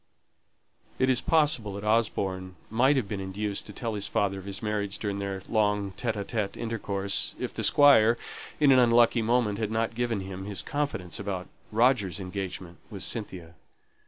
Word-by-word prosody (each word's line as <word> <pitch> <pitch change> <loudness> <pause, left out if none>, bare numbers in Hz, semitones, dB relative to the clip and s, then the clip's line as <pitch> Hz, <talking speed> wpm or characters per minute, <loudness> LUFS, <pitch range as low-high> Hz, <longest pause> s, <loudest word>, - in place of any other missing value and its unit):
It 130 0 +3
is 130 0 +1
possible 150 -10 +2
that 100 - -6
Osborne 95 -4 0 0.2
might 130 +6 +4
have 130 -7 0
been 100 -1 -4
induced 100 +2 -3
to - - -8
tell 115 +2 -4
his 105 -1 -3
father 100 -1 0
of 95 - -11
his 100 +1 -5
marriage 105 -2 -2
during 100 -2 -3
their 100 -1 -4
long 105 -3 +1
solitary 110 -2 -2
intercourse, 100 -4 -1
if - - -4
the - - -4
Squire, 120 -5 +6 0.4
in 145 -2 +5
an 130 - +6
unlucky 120 -1 +5
moment, 115 -2 +1
had 110 -2 -1
not 115 +1 -1
given 120 -3 -1
him 95 0 -7
his 100 -1 -3
confidence 145 - -3
about 95 -2 -4 0.2
Roger's 110 -4 +2
engagement 90 -2 -6
with 100 -3 -7
Cynthia. 95 -7 -5
105 Hz, 165 wpm, -28 LUFS, 95-115 Hz, 0.4 s, Squire